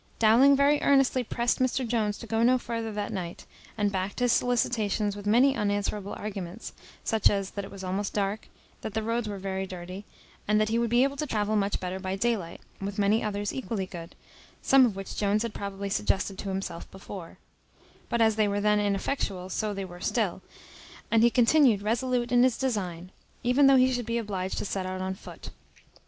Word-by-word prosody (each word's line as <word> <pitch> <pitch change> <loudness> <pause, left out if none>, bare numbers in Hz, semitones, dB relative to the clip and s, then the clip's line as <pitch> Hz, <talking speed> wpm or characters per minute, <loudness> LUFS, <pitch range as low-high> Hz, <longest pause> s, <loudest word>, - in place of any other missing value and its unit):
Dowling 240 +6 +6
very 285 +1 +3
earnestly 270 -2 +3
pressed 235 +1 0
Mr 255 0 0
Jones 215 -3 0
to - - -9
go 225 0 0
no 250 +2 +5
further 230 -2 -4
that 205 -1 -4
night; 175 -2 -5 0.3
and 205 -1 +1
backed 190 +2 -3
his 245 -1 +3
solicitations 215 -5 +1
with 205 0 -7
many 255 +6 +4
unanswerable 205 -1 -1
arguments, 195 -1 -6 0.3
such 220 -2 +3
as, 195 -2 -2
that 200 - -5
it 195 - -8
was 195 -1 -9
almost 190 +2 -2
dark, 205 +1 -2 0.3
that 215 - -6
the 220 - 0
roads 230 0 -1
were 200 - -4
very 190 0 -3
dirty, 185 +2 -7 0.4
and 210 0 +3
that 215 0 +1
he 230 +1 +1
would 235 -1 0
be 240 +2 +4
able 275 +1 -1
to 300 - -2
travel 215 -3 0
much 200 -1 0
better 185 +1 -4
by 190 0 -3
day 235 +4 +1
light, 170 -5 -8 0.2
with 195 0 -4
many 205 +2 +2
others 205 -1 -2
equally 225 -7 -3
good, 170 -3 -9 0.5
some 265 -2 +6
of 210 - -4
which 195 0 -7
Jones 210 +1 +1
had 230 -2 -4
probably 200 0 -5
suggested 195 -1 0
to 200 - -4
himself 190 -3 -5
before; 190 -2 -9 0.7
but 235 - 0
as 220 -1 +3
they 215 -1 +3
were 205 0 0
then 210 0 +3
ineffectual, 200 -2 -1
so 215 -1 -1
they 195 -1 -4
were 175 -1 -11
still: 200 -6 -1 0.7
and 225 - +4
he 235 - +6
continued 240 -3 +4
resolute 240 +2 0
in 245 0 +5
his 255 -2 +3
design, 185 -9 -3 0.3
even 250 +3 +4
though 275 - +7
he 255 0 +4
should 245 -2 -3
be 235 0 0
obliged 195 -4 -3
to - - -2
set 190 -2 -3
out 185 0 -4
on 190 0 -2
foot. 190 - -11
210 Hz, 205 wpm, -27 LUFS, 195-235 Hz, 0.7 s, though